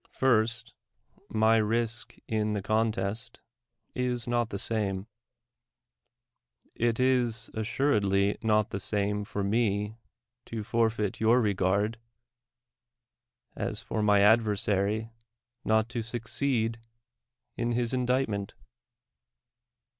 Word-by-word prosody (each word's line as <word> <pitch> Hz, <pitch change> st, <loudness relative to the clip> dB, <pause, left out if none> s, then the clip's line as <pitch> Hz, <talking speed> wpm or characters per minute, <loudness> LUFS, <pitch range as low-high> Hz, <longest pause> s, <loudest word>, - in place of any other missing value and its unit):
First, 115 Hz, -2 st, +1 dB, 0.6 s
my 110 Hz, +1 st, +4 dB
risk 115 Hz, +2 st, -1 dB
in 110 Hz, -1 st, 0 dB
the 100 Hz, -2 st, -2 dB
contest 110 Hz, +1 st, -1 dB, 0.5 s
is 125 Hz, -2 st, -1 dB
not 120 Hz, -1 st, +1 dB
the 100 Hz, -, -4 dB
sairic. 100 Hz, -3 st, -2 dB, 1.7 s
It 115 Hz, 0 st, 0 dB
is 120 Hz, -4 st, +1 dB
assuredly 105 Hz, -4 st, +1 dB
not 105 Hz, -1 st, +2 dB
the 100 Hz, -, -3 dB
same 105 Hz, +1 st, -1 dB
for 100 Hz, -1 st, -3 dB
lae 105 Hz, 0 st, 0 dB, 0.5 s
to 110 Hz, -2 st, -4 dB
forfeit 110 Hz, -2 st, 0 dB
your 115 Hz, +3 st, +4 dB
regard, 100 Hz, +1 st, +1 dB, 1.6 s
as -, -, -3 dB
for 110 Hz, -, -2 dB
my 105 Hz, -1 st, +4 dB
adv^^rsary 105 Hz, 0 st, +2 dB, 0.5 s
not 110 Hz, 0 st, +2 dB
to 120 Hz, 0 st, -3 dB
succeed 115 Hz, 0 st, -1 dB, 0.8 s
in 120 Hz, 0 st, -1 dB
his 120 Hz, +1 st, 0 dB
indictment. 125 Hz, -6 st, 0 dB
110 Hz, 95 wpm, -28 LUFS, 105-115 Hz, 1.7 s, my